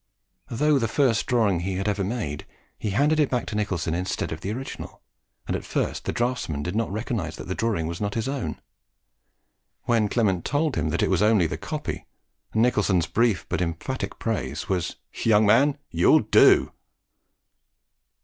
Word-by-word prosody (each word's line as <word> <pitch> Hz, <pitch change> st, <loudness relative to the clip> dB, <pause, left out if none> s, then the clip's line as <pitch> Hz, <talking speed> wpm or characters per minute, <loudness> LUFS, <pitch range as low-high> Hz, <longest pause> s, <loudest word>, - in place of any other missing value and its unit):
Though 145 Hz, +4 st, +2 dB
the 115 Hz, -, 0 dB
first 115 Hz, -1 st, +1 dB
drawing 110 Hz, -8 st, +2 dB
he 95 Hz, +2 st, -2 dB
had 95 Hz, +2 st, -2 dB
ever 100 Hz, -1 st, 0 dB
made, 95 Hz, -, -4 dB, 0.3 s
he 105 Hz, -, -2 dB
handed 145 Hz, +9 st, +2 dB
it 150 Hz, -, +3 dB
back 125 Hz, -2 st, -1 dB
to 105 Hz, -, -5 dB
Nicholson 90 Hz, -6 st, -1 dB
instead 90 Hz, +2 st, -2 dB
of -, -, -5 dB
the 100 Hz, -, -3 dB
original, 130 Hz, +4 st, -7 dB, 0.5 s
and -, -, -2 dB
at -, -, -4 dB
first -, -, -2 dB
the -, -, 0 dB
draughtsman 120 Hz, -, -2 dB
did 90 Hz, +5 st, -3 dB
not 115 Hz, -2 st, 0 dB
recognise 105 Hz, -, -3 dB
that -, -, -9 dB
the 95 Hz, -, -2 dB
drawing 105 Hz, -6 st, -1 dB
was 85 Hz, +3 st, -5 dB
not 100 Hz, -1 st, -2 dB
his 115 Hz, +2 st, -1 dB
own. 130 Hz, -, -3 dB, 1.2 s
When 115 Hz, -3 st, +2 dB
Clement 100 Hz, -7 st, +1 dB
told 145 Hz, +1 st, 0 dB
him 80 Hz, -1 st, 0 dB
that -, -, 0 dB
it -, -, +1 dB
was -, -, +2 dB
only 105 Hz, -4 st, +4 dB
the -, -, -2 dB
copy, -, -, -5 dB, 0.5 s
Nicholson's 105 Hz, -7 st, +2 dB
brief 110 Hz, -1 st, +1 dB
but -, -, -2 dB
emphatic 85 Hz, +10 st, -3 dB
praise 80 Hz, -, -3 dB
was 90 Hz, -3 st, -1 dB, 0.2 s
"Young 110 Hz, -1 st, +3 dB
man, 135 Hz, +7 st, +4 dB
YOU'LL 85 Hz, +1 st, +5 dB
DO!" -, -, +5 dB
105 Hz, 175 wpm, -25 LUFS, 90-120 Hz, 1.2 s, YOU'LL